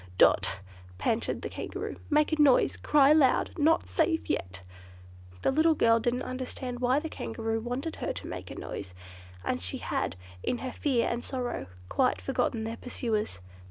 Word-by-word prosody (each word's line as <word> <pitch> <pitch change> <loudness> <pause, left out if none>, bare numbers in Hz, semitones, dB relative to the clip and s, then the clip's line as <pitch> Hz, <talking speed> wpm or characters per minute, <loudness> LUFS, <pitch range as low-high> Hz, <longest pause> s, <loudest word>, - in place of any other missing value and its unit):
"Dot," - - +5 0.4
panted 220 - -1
the - - -3
Kangaroo, - - -5
"make 300 +1 +3
a 310 - +3
noise! 275 -4 +5
Cry 290 -1 +5
loud! 280 -5 +4
Not 320 +2 +3
safe 325 -1 +1
yet!" 90 -1 -3 0.8
The - - +3
little 315 +3 +4
girl 230 -4 +4
didn't 240 +2 0
understand 255 -1 -5
why 250 +2 +3
the 320 - -4
Kangaroo 225 - -3
wanted 250 +7 -3
her - - -2
to - - -7
make - - -6
a - - -7
noise, 95 -2 -6 0.5
and 85 - -1
she 90 +1 -2
had, - - -2 0.3
in 245 - -1
her 260 +1 -4
fear 255 -4 +1
and 235 0 -2
sorrow, 245 - -3 0.2
quite 255 - +2
forgotten 240 -4 -1
their 225 +1 -4
pursuers. 220 - -2
250 Hz, 165 wpm, -29 LUFS, 225-285 Hz, 0.8 s, Dot